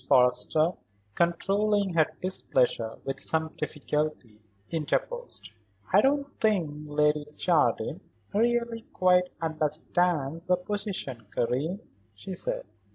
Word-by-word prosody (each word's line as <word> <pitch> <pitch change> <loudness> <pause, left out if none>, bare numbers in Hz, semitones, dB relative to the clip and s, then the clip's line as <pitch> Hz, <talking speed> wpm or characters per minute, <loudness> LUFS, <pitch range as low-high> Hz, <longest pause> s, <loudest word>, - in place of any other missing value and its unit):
Forrester, 125 +6 +4 0.4
controlling 195 - +1
her 160 -2 +4 0.2
displeasure 125 -10 0
with 135 0 -3
some 160 +1 0
difficulty, 150 -7 -3 0.3
interposed. 485 - -2 0.4
"I 200 - +8
don't 280 +2 +2 0.2
think 165 -9 +1
Lady 150 0 +2
Jardine - - +1 0.3
really 235 +1 +1
quite 180 -1 +4
understands 160 0 0
the 180 0 +4
position, 180 - -4
Karen," 145 - -1 0.3
she 185 - -7
said. 180 - -3
165 Hz, 95 wpm, -28 LUFS, 150-195 Hz, 0.4 s, I